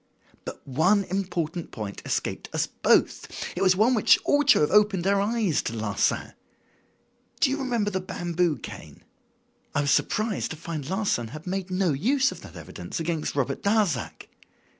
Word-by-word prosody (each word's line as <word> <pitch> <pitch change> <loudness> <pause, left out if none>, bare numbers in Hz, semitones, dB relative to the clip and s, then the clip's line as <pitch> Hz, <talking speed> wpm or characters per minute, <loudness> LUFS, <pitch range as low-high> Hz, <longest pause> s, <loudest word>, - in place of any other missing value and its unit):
"But - - -8
one 180 +10 +3
important 175 -3 -3
point 105 -3 -6
escaped - - -2
us - - +1
both. - - +2 0.3
It 180 - -3
was 185 -1 +5
one 220 +6 +4
which 220 - +5
ought 290 -1 +2
to - - +6
have 150 - +2
opened 205 -3 +3
our 200 0 +3
eyes 210 -5 +1
to - - -4
Larsan. 110 -2 -1 1.1
Do 270 - +3
you 280 - -1
remember 235 -6 0
the 190 - -1
bamboo 175 -3 -1
cane? - - -10 0.7
I 145 - +3
was 145 0 +1
surprised 215 +5 0
to 160 - -6
find 155 -3 -6
Larsan 190 - 0
had 155 +7 -10
made 190 0 -3
no 185 -3 +1
use 260 - +2
of - - -10
that - - -12
evidence - - -7
against 165 -2 -2
Robert 140 -1 -1
Darzac. 200 - 0
185 Hz, 165 wpm, -26 LUFS, 155-210 Hz, 1.1 s, to